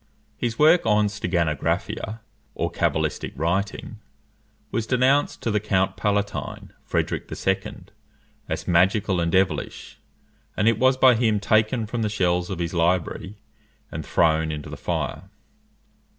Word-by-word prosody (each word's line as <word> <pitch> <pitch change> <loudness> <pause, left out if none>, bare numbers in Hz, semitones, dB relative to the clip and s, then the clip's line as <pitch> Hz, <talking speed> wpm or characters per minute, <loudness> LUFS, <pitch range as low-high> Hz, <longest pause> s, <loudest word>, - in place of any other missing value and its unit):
His 115 -1 -3
work 160 +3 +5
on 105 -1 +3
steganographia, 90 +3 -2 0.3
or - - -2
cabalistic - - -1
writing, 100 +6 -2 0.7
was 115 -1 -2
denounced 130 +3 +2
to 115 - 0
the 105 - +2
Count 95 -2 0
Palatine, 100 -1 -2
Frederic - - -2
II., - - -2 0.7
as - - -4
magical 95 +2 +3
and 85 -1 0
devilish; 95 -4 -1 0.6
and 105 - +2
it 115 -1 +3
was 130 0 +4
by 130 -1 +6
him 110 -3 +2
taken 110 +3 +2
from 115 +2 -3
the 110 - 0
shelves 90 -3 0
of 95 - -3
his 85 0 -3
library 90 +3 0 0.5
and - - -5
thrown 80 -1 +2
into 75 -1 -6
the - - -5
fire. - - -4
105 Hz, 135 wpm, -24 LUFS, 90-115 Hz, 0.7 s, by